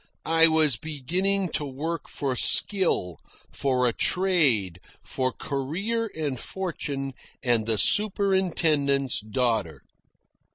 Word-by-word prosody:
I 165 0 +6
was 155 -5 +3
beginning 180 +7 -1
to 155 -1 -2
work 150 +4 -5
for 135 -3 -3
skill, 125 - +2 0.3
for 130 -2 0
a 120 - 0
trade, 140 - +1 0.2
for 130 -1 -2
career 195 - -3
and 145 -5 -3
fortune, 140 -8 -5 0.3
and 115 -3 0
the 110 -1 0
superintendent's 165 - +1
daughter. 110 -6 -2
145 Hz, 100 wpm, -25 LUFS, 125-180 Hz, 0.3 s, I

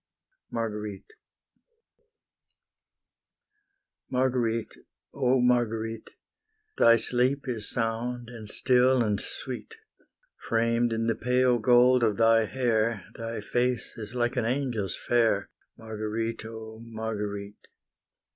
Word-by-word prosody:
MARGUERITE 105 -3 -5 3.0
Marguerite, 125 -3 0 0.4
oh 130 -1 +2
Marguerite! 115 -2 0 0.7
Thy 115 0 +7
sleep 125 +4 +1
is 115 -4 -2
sound, 120 +1 -2
and 115 -3 -10
still 125 0 +3
and 105 -3 0
sweet, 130 - -7 0.7
Framed 115 +1 +2
in 115 0 -1
the 115 - +2
pale 125 +1 +2
gold 125 +2 +5
of 110 -3 +2
thy 115 -1 +5
hair, 115 -3 0
Thy 115 -1 -5
face 125 +2 -1
is 110 +2 -8
like 120 -1 0
an 120 - +1
angel's 120 -6 -1
fair, 115 -5 +1 0.3
Marguerite, 110 +1 -4
oh 110 0 -8
Marguerite! 105 -3 -5
115 Hz, 100 wpm, -27 LUFS, 110-125 Hz, 3.0 s, Thy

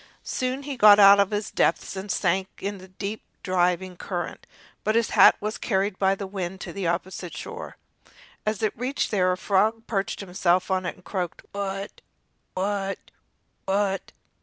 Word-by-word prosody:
Soon 255 +2 -2
he 280 -1 -4
got 210 -2 +9
out 200 0 +8
of 200 -1 +4
his 205 -1 -3
depth 165 - +1
and 190 +2 -6
sank 190 +2 +1
in 200 0 -4
the 185 - -12
deep, 200 +3 -5 0.2
driving 180 0 +1
current; 175 0 -5 0.4
but 215 - +1
his 230 -1 +2
hat - - +7
was 215 +1 -4
carried 195 -2 0
by 195 0 +3
the 195 - -5
wind 190 -1 -5
to - - -6
the 195 -3 -2
opposite 175 -1 -3
shore. - - -7 0.7
As 215 0 -2
it 215 - +1
reached 255 +4 -2
there 185 -3 +3
a 180 - -1
frog 215 +4 +1
perched 195 -3 -2
himself 185 -1 +1
on 185 -1 0
it, - - -4
and 180 - -22
croaked: 180 -4 -4
"Wat! 195 0 -4 0.6
wat! 195 0 -1 0.7
wat!" 195 0 0
195 Hz, 170 wpm, -25 LUFS, 185-205 Hz, 0.7 s, got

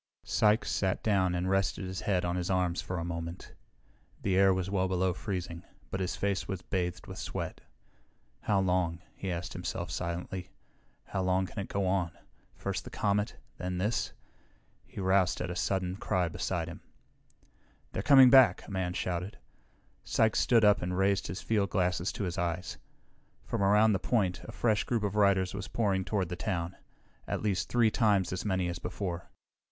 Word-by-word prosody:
Sykes 105 +1 +2
sat 95 -1 0
down 95 -4 +2
and 90 +1 -1
rested 95 0 +1
his 95 -1 -5
head 90 -3 +1
on 85 0 -1
his 90 0 -2
arms 90 -2 +1
for 90 - -4
a 85 - -3
moment. 85 0 -6 0.7
The 95 -2 +1
air 95 0 +6
was 95 -1 0
well 95 -1 +1
below 95 0 +1
freezing, 90 -3 -4 0.3
but 95 - -2
his 95 -1 -1
face 95 -3 -1
was 95 -3 -4
bathed 90 -2 -2
with - - -8
sweat. - - -5 0.8
How 100 -2 +1
long? 90 -2 0
he 95 - -4
asked 85 0 -4
himself - - -4
silently. 90 +2 -4 0.5
How 95 - -3
long 95 0 +2
can 100 - -7
it 100 - -3
go 100 -1 -1
on? 90 -3 0 0.4
First - - -3
the - - -8
comet, 105 +1 0 0.2
then 90 0 -3
this. 105 +6 0 0.8
He - - -9
roused 95 -1 +2
at - - -3
a - - -4
sudden 90 0 -1
cry 90 -3 0
beside 85 +1 -2
him. 85 - -8 1.1
"They're - - -2
coming 130 +2 +8
back," 130 -3 +6
a - - -9
man 95 -2 -1
shouted. 90 +2 -3 0.7
Sykes 110 -1 +2
stood 115 -3 +4
up 105 0 +5
and 90 +1 -2
raised 95 0 +2
his 95 - -5
fieldglasses 95 -4 +1
to - - -3
his 90 0 -2
eyes. 85 0 -2 0.7
From - - -2
around 105 +2 +5
the 95 - +1
point 95 -6 0
a - - -7
fresh 110 -4 +1
group 115 -3 -1
of 100 0 -1
riders 100 -3 +3
was 100 -1 -5
pouring 100 -4 0
toward 95 -3 -1
the 90 - -3
town. 90 -2 -2 0.5
At - - -2
least 100 -3 0
three 120 -3 +3
times 100 -6 +2
as 95 - -3
many 95 -3 0
as 85 0 -4
before. 90 -2 -4
95 Hz, 180 wpm, -30 LUFS, 90-100 Hz, 1.1 s, coming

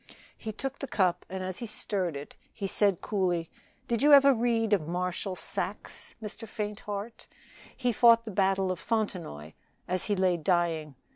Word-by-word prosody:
He 220 - -6
took 270 +5 -5
the 275 - -4
cup, 185 -7 +1
and 190 0 -4
as 185 -1 -4
he 235 - -5
stirred 190 -6 -1
it 140 +1 -8 0.2
he 200 - -5
said 195 -1 +2
coolly, 180 -5 -1 0.4
"Did 235 0 0
you 295 +1 +6
ever 275 -1 +8
read 225 -2 +1
of 165 -7 +1
Marshal 180 +2 -2
Saxe, - - -4
Mr. 220 +1 -7
Faintheart? 210 +1 -5 0.5
He 250 -2 +1
fought 230 +1 +6
the 220 - -5
battle 190 -1 +2
of 180 - -4
Fontenoy 175 - -3 0.4
as 185 0 0
he 205 - +1
lay 185 -1 +3
a - - -1
dying. 160 -3 0
200 Hz, 170 wpm, -29 LUFS, 180-225 Hz, 0.5 s, ever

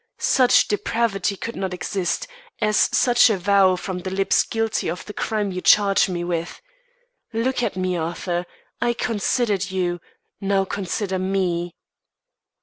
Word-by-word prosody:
Such 255 -2 +4
depravity 205 -2 -1
could 230 +4 -6
not 190 -2 -3
exist, 180 -1 -2 0.3
as 210 -1 +3
such 245 -1 +5
a 215 - +1
vow 190 0 +4
from 180 0 -5
the 185 - -5
lips 195 +1 +2
guilty 225 -1 -1
of 180 - -5
the 210 - -8
crime 210 -2 -2
you 185 0 -4
charge 200 -1 +4
me 175 -1 -3
with. 170 -1 -3 0.7
Look 245 +3 0
at 240 - -1
me, 185 -1 -1
Arthur. 175 +2 -3 0.3
I 240 0 +2
considered 215 -4 0
you 180 -2 -1 0.4
now 195 -1 +1
consider 190 0 -3
me." 180 -2 -1
195 Hz, 145 wpm, -22 LUFS, 180-215 Hz, 0.7 s, such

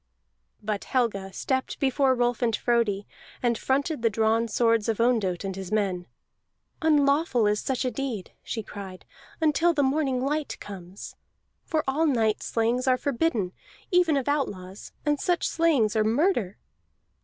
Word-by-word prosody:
But 205 -1 -3
Helga 210 -7 -1
stepped 260 +7 -2
before 270 -1 +2
Rolf 245 0 0
and 230 -3 +2
Frodi, 215 -4 +1 0.4
and 240 -1 +2
fronted 280 +4 -1
the 230 - +3
drawn 225 +2 +1
swords 230 0 +2
of 225 - -1
Ondott 220 -7 +1
and 195 -1 -4
his 190 0 -7
men. 190 -4 0 0.7
"Unlawful 290 -5 +3
is 210 0 +1
such 265 0 -1
a 255 - 0
deed," 250 -9 -4
she 225 - -4
cried, 195 -3 -9 0.3
"until 320 +2 +3
the 290 - +3
morning 270 -1 +1
light 300 +1 -2
comes. 190 -1 -9 0.5
For 315 -2 0
all 305 +5 +2
night 225 -6 +1
slayings 240 +3 0
are 255 -1 +4
forbidden, 245 - 0 0.4
even 355 -5 +4
of 270 - -2
outlaws, 200 -10 -3
and 295 -1 +1
such 355 -1 +1
slayings 290 -11 +2
are 215 - +3
murder." 230 - +1
240 Hz, 150 wpm, -26 LUFS, 210-280 Hz, 0.7 s, are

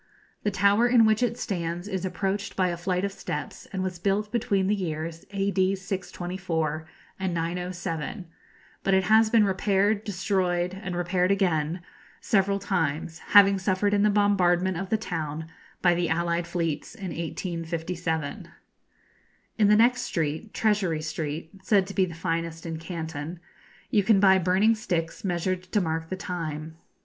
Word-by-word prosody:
The 210 - +1
tower 200 +4 +4
in 240 -2 +6
which 220 +1 +3
it 240 -1 +1
stands 175 -2 -3
is 190 -2 -3
approached 195 +1 -2
by 185 -1 +2
a 175 - -2
flight 180 +2 -1
of 200 - -2
steps, 150 -5 -6
and 190 -1 -2
was 185 -2 -4
built 200 +3 0
between 210 -5 +1
the 200 - +2
years 165 -4 -4
A.D. 195 -1 +1
624 175 -4 -3 0.3
and 190 -2 -1
907; 175 +1 -3 0.6
but 195 - +3
it 190 - +3
has 220 +2 +5
been 225 -1 +5
repaired, 200 +2 +1
destroyed, 180 -3 0
and 190 -2 -5
repaired 180 +1 +1
again, 175 -4 +1 0.4
several 200 -2 +2
times, 165 -5 -2
having 200 -1 +6
suffered 190 +2 +1
in 205 - +3
the 210 - +4
bombardment 190 -3 +3
of 190 +3 -4
the 220 - +2
town 160 -6 -4 0.4
by 175 -1 +6
the 175 0 0
allied 170 +1 0
fleets 170 -3 -2
in 190 -2 -6
1857. 165 -2 -3 1.1
In 210 - +5
the 210 - +6
next 240 +3 +4
street, 160 +5 -2
Treasury 195 -8 +1
Street 155 0 -4
(said 195 0 +3
to 195 - -8
be 190 - +3
the 170 -3 -8
finest 165 0 -3
in 165 -1 -4
Canton), 165 -1 -5 0.5
you 210 - +4
can 200 0 +4
buy 190 -1 +6
burning 190 +5 +3
sticks 175 -8 -3
measured 180 0 -1
to 210 - +3
mark 160 -2 -2
the 185 - -3
time. 160 -4 -5
185 Hz, 160 wpm, -26 LUFS, 165-200 Hz, 1.1 s, in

